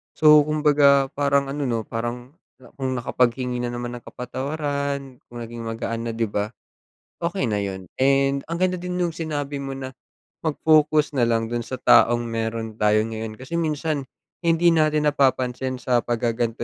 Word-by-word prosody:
So 150 -1 +7
kumbaga 145 -3 +4
parang 140 -1 +1
ano 145 -1 -2
'no, 115 -2 -1
Parang 120 +3 -5 0.5
kung 130 -1 -1
nakapaghingi 125 +1 0
na 120 - -2
naman 120 0 -4
ng 120 - -15
kapatawaran, 140 0 -4
kung 120 - -11
naging 115 0 -8
magaan 115 0 -3
na - - -1
'di 115 - 0
ba? 105 +1 -2 0.7
Okey 170 - -1
na 105 - 0
yun 95 -3 -4
and 135 +1 +2
ang 170 +2 -4
ganda 185 0 +2
din 180 +1 -5
nung 180 -1 0
sinabi 150 -3 -4
mo 135 -1 -5
na 135 -1 -6 0.6
mag-focus 155 -1 +3
na 120 - +4
lang 115 -1 0
dun 120 -1 -3
sa - - -9
taong 120 0 +5
meron 115 -1 -3
tayo 105 0 +3
ngayon 110 -1 -5
kasi 130 +9 -5
minsan 155 -3 -1 0.4
hindi 170 +1 +4
natin 155 -2 +3
napapansin 130 -2 0
sa 125 -1 +2
paggagan'to 120 -1 -1
130 Hz, 160 wpm, -23 LUFS, 120-150 Hz, 0.7 s, So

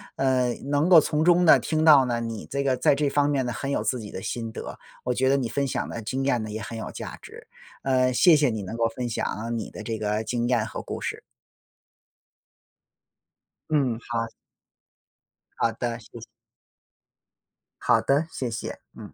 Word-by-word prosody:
呃， 130 -2 +1 0.2
能 145 +4 +2
够 175 -3 +10
从 150 +1 0
中 175 0 +5
呢 - - +8
听 155 -1 -1
到 145 -4 +8
呢 120 -1 -1
你 115 -2 -5
这 140 0 -1
个 135 -2 +2
在 130 +2 +3
这 145 0 +1
方 145 0 +2
面 135 -3 +1
呢 120 - -2
很 135 +4 -4
有 140 - 0
自 125 - -1
己 105 -2 -8
的 95 - -6
心 115 -2 -4
得。 - - -7 0.3
我 125 - 0
觉 130 +2 +1
得 140 - +4
你 120 -4 -2
分 140 +4 -1
享 - - -2
的 115 - -5
经 130 +5 -3
验 125 -4 +1
呢 110 - -5
也 110 +1 -5
很 115 +2 -6
有 110 - -5
价 - - -7
值。 - - -13 0.4
呃， 130 -1 +2
谢 165 +6 +6
谢 145 -3 +3
你 110 -2 -3
能 95 +4 -6
够 115 -1 +2
分 125 -1 -3
享 115 +1 -3
你 110 - -5
的 105 - -8
这 110 0 -3
个 105 +1 -1
经 120 +1 -1
验 120 -3 +2
和 - - -6
故 - - -6
事。 - - -4 2.5
嗯， 135 -7 +1
好。 115 -1 -1 1.3
好 115 - +2
的， 120 +1 -3
谢 105 - -16
谢。 - - -9 1.6
好 - - +3
的， 145 +4 +1
谢 125 -3 -3
谢。 115 - -5 0.2
嗯。 - - -10
125 Hz, 210 characters per minute, -25 LUFS, 115-140 Hz, 2.5 s, 够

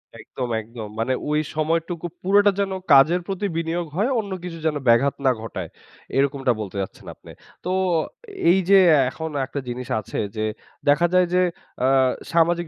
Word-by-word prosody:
একদম, 125 +3 -6
একদম। 110 -1 -8
মানে 130 +3 +1 0.2
ওই 150 0 +2 0.2
সময়টুকু 165 +2 -1 0.2
পুরোটা 205 +2 +4
যেন 195 -1 0 0.2
কাজের 160 +6 +6
প্রতি 195 +1 -2
বিনিয়োগ 165 +1 -1
হয়, 215 +8 +1
অন্য 200 -3 -5
কিছু 170 -2 -6
যেন 155 - +1
ব্যাঘাত 120 +4 +4
না 130 - +6
ঘটায়। 95 -6 -6 0.5
এইরকমটা 135 -2 +2
বলতে 100 -1 -7
চাচ্ছেন 95 - -8
আপনে। - - -15 0.3
তো 180 - -1 0.8
এই 190 +2 +5
যে 195 -1 +8 0.3
এখন 160 +4 -5 0.2
একটা 140 +1 -5
জিনিস 125 +1 -5
আছে 105 - -5 0.2
যে 110 0 -1 0.4
দেখা 170 +4 +4
যায় 180 -1 +4
যে 180 - +4 0.4
আ - - +4 0.4
সামাজিক 170 0 +2
160 Hz, 160 wpm, -23 LUFS, 130-180 Hz, 0.8 s, যে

